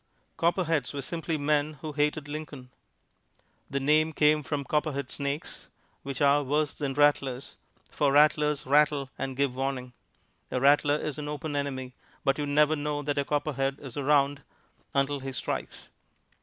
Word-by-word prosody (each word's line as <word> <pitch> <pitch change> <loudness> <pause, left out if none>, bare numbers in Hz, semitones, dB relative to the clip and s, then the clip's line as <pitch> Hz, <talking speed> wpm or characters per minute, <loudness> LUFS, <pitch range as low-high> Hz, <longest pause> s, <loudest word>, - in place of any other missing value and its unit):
Copperheads 165 -5 +1
were 140 - -3
simply 165 +2 -3
men 150 +1 +1
who 155 - -4
hated 150 0 0
Lincoln. 145 -4 -7 1.0
The 140 - -1
name 155 +3 +3
came 150 0 +4
from 145 0 -3
copperhead 140 -1 -1
snakes, 140 +2 -4 0.3
which 140 +1 -3
are 145 +1 +5
worse 145 +2 0
than 140 -3 -3
rattlers, 140 -3 +1 0.4
for 145 -2 +2
rattlers 150 0 +3
rattle 145 -1 +3
and 135 -1 -3
give 140 -2 +1
warning. 130 -2 -3 0.6
A 125 - -1
rattler 145 +2 +4
is 150 0 -4
an 145 - -5
open 150 0 -4
enemy, 130 -3 -3 0.3
but 135 +1 +1
you 145 - -1
never 150 +2 +4
know 145 0 -2
that 145 0 -1
a - - +2
copperhead 140 -2 -1
is 135 -4 -8
around 145 0 +2 0.5
until 140 +1 +1
he 135 0 -5
strikes. 130 - -5
145 Hz, 155 wpm, -28 LUFS, 135-150 Hz, 1.0 s, are